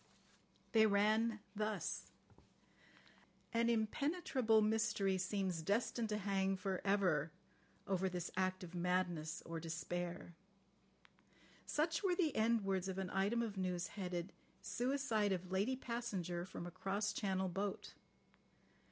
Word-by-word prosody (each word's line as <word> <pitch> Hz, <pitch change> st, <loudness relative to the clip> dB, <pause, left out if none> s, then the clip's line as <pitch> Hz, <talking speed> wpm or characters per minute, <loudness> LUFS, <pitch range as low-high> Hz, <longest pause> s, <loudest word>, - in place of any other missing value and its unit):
They 220 Hz, -1 st, +6 dB
ran 215 Hz, +2 st, +3 dB
thus: 215 Hz, 0 st, -2 dB, 1.5 s
"An 230 Hz, 0 st, +3 dB
impenetrable 235 Hz, 0 st, +2 dB
mystery 215 Hz, -3 st, +2 dB
seems 185 Hz, -2 st, -1 dB
destined 225 Hz, +5 st, 0 dB
to 210 Hz, -, 0 dB
hang 195 Hz, -1 st, +1 dB
for 190 Hz, 0 st, -2 dB
ever 185 Hz, -7 st, +2 dB, 0.5 s
over 190 Hz, -1 st, +1 dB
this 180 Hz, -1 st, -3 dB
act 185 Hz, 0 st, 0 dB
of 175 Hz, -1 st, -8 dB
madness 175 Hz, -3 st, 0 dB
or 165 Hz, 0 st, -4 dB
despair." 175 Hz, +2 st, -4 dB, 1.3 s
Such 315 Hz, +2 st, +1 dB
were 375 Hz, -3 st, +2 dB
the 330 Hz, -5 st, +1 dB
end 225 Hz, 0 st, +3 dB
words 190 Hz, -1 st, 0 dB
of 190 Hz, -1 st, -3 dB
an 190 Hz, -1 st, -2 dB
item 205 Hz, +5 st, +2 dB
of 210 Hz, -3 st, -4 dB
news 185 Hz, 0 st, -1 dB
headed: 180 Hz, -2 st, -4 dB, 0.3 s
"Suicide 240 Hz, -5 st, 0 dB
of 185 Hz, -1 st, -2 dB
Lady 200 Hz, +8 st, +2 dB
Passenger 200 Hz, -9 st, -3 dB
from 185 Hz, -2 st, -6 dB
a 175 Hz, -, -6 dB
cross 200 Hz, +3 st, -1 dB
Channel 190 Hz, -2 st, 0 dB
Boat." 195 Hz, +2 st, -3 dB
195 Hz, 125 wpm, -39 LUFS, 185-220 Hz, 1.5 s, They